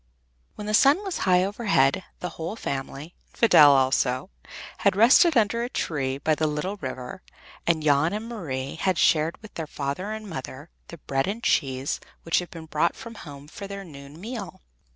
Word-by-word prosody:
When 210 - -7
the 210 - -2
sun 280 - +5
was 385 -3 -3
high 180 0 +5
overhead, 195 - +1 0.2
the 180 - -3
whole 165 +6 -6
family, 140 -1 -5 0.2
and - - -25
Fidel 150 -11 +7
also, 130 - +1 0.5
had - - +2
rested 265 - +6
under 225 +1 +2
a 240 - -3
tree 135 - -2
by 155 +3 +1
the 155 +1 0
little 155 +7 -3
river, 130 +1 -6 0.5
and 165 -2 +2
Jan 145 +2 +3
and 215 +2 -4
Marie 140 - -4
had 185 0 0
shared 160 -1 +2
with 215 - -12
their 160 -2 -5
father 145 +9 -4
and 215 0 -6
mother 140 -1 -8 0.2
the 170 - -10
bread 135 -1 -2
and 220 +4 -4
cheese 135 -1 0 0.2
which 165 - +2
had 180 - -6
been 165 -1 -9
brought 155 +2 0
from 230 - -9
home 145 -8 -11
for 200 +6 -8
their 200 0 -7
noon 140 -2 -12
meal. 215 - -7
165 Hz, 185 wpm, -25 LUFS, 140-205 Hz, 0.5 s, Fidel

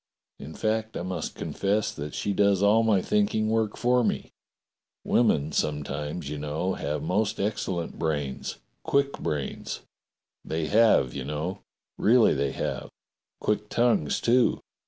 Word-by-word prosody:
In 75 +3 -9
fact, 110 0 -1
I - - -3
must 90 -3 -4
confess 100 +2 -1
that 75 +1 -6
she 100 - -1
does 100 -1 +3
all 105 +2 +5
my 110 -4 +3
think 210 -1 +1
ing 110 0 +1
work 110 -2 0
for 125 0 +3
me. - - -1 0.7
Women 80 -11 +2
sometimes, 75 +1 -2
you 75 +1 -4
know, 75 +6 -2
have 75 +1 -3
most 100 +5 0
excellent 95 -4 -2
brains 75 -4 -2
— - - -46
quick 140 0 +1
brains. 75 -3 -3 0.6
They 80 0 -2
have, 105 - +4
you 70 - -4
know. 75 +8 -3 0.4
Really 115 +2 +5
they 70 -1 0
have. - - -3 0.5
Quick 105 0 0
tongues, 120 -11 +2
too. 120 +1 +3
95 Hz, 145 wpm, -27 LUFS, 75-110 Hz, 0.7 s, all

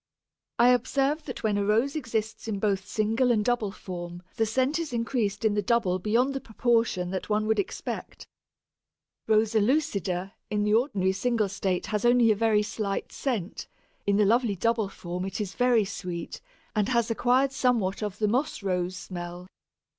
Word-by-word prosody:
I 240 +1 +6
observe 275 +5 +1
that 255 - -7
when 210 -2 +1
a - - +1
Rose 225 +8 +2
exists 220 -6 -3
in 215 -2 -2
both 195 -1 0
single 225 +4 +1
and 210 -3 +1
double 240 -4 +1
form 175 -2 -7
the 225 - +1
scent 260 +7 +1
is 320 -6 -4
increased 230 -3 -1
in 215 - +3
the 205 - +1
double 195 -4 +1
beyond 235 +7 +1
the 270 - -3
proportion 225 -6 0
that 190 +2 -4
one 215 0 +1
would 220 0 +1
expect. 385 - -5 1.0
Rosa 220 0 +3
lucida 200 - 0 0.2
in 210 -1 0
the 210 0 +2
ordinary 210 -6 +2
single 215 +1 0
state 190 -2 -1
has 210 -1 -2
only 240 -1 +5
a - - +3
very 215 -1 +2
slight 210 -2 -3
scent; 220 -9 -3 0.4
in 200 0 +3
the 210 - +4
lovely 230 0 +2
double 225 +1 0
form 180 -1 -5
it 195 +2 -4
is 200 -3 -3
very 245 -4 +3
sweet, 180 -4 -6 0.3
and 210 -1 +1
has 235 -2 +1
acquired 255 +4 +2
somewhat 235 -8 +1
of 205 -2 -3
the 215 - +1
Moss 245 0 -1
rose 185 -1 -1
smell. 175 -1 -7
215 Hz, 175 wpm, -27 LUFS, 195-240 Hz, 1.0 s, I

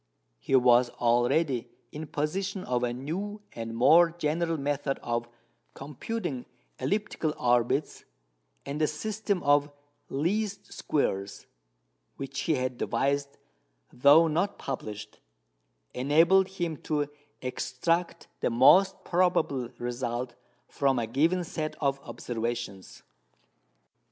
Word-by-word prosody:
He 60 - 0
was 125 -1 +5
already 120 +3 +1 0.2
in 155 +1 -7
possession 185 +7 -2
of 125 -1 -1
a 120 -1 0
new 185 - -5
and 115 0 -6
more 165 +8 +6
general 165 0 -1
method 140 -1 -1
of 120 0 -2 0.5
computing 145 - -5 0.3
elliptical 200 -7 -1
orbits; 120 +4 +1 0.6
and 145 +2 -4
the 155 - +4
system 205 +4 -2
of 145 0 +4 0.4
"least 200 +7 -2
squares," 100 -9 -2 0.7
which 140 0 -5
he 160 - +1
had 130 -1 -2
devised 140 0 -1 0.6
though 145 +6 +6
not 175 +6 0
published, 105 -5 -6 0.7
enabled 165 +9 +4
him 175 -5 -3
to 150 -1 -1 0.4
extract 165 +7 -1
the - - +1
most 180 +11 +5
probable 165 -8 +1
result 120 0 -3 0.3
from 135 -2 +1
a 120 - 0
given 160 +10 +1
set 155 -2 -4
of 140 -2 0
observations. 115 -6 -5
145 Hz, 105 wpm, -28 LUFS, 125-170 Hz, 0.7 s, more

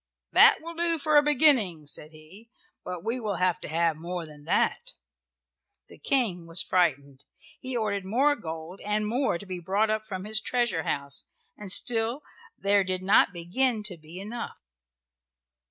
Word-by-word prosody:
"That - - +7
will 335 +1 -7
do 335 0 0
for 305 0 0
a 295 - +8
beginning," 255 - +3
said 150 +1 -6
he, 160 +9 -16 0.3
"but 180 -2 -6
we 235 +3 -1
will 210 -4 -2
have 180 0 +1
to - - -7
have 165 +1 +1
more 170 +1 -5
than 150 -1 -14
that." - - 0 0.9
The - - -15
King 200 -11 0
was 165 +2 -2
frightened. 145 -7 0 0.4
He 255 -1 -4
ordered 200 -3 -1
more 265 +10 +2
gold 165 - -8
and 210 +1 0
more 240 -3 0
to 200 - -11
be 185 -2 -6
brought 200 +5 +1
up 215 0 -2
from 190 -3 -5
his 215 0 -1
treasure 240 -10 0
house, 140 0 -3 0.3
and 205 -3 -3
still 235 +5 +2 0.3
there 200 0 +3
did 185 0 -3
not 200 +1 +5
begin 210 +7 0
to 195 -4 -4
be 160 +3 -11
enough. 230 +4 -6
195 Hz, 170 wpm, -27 LUFS, 170-235 Hz, 0.9 s, a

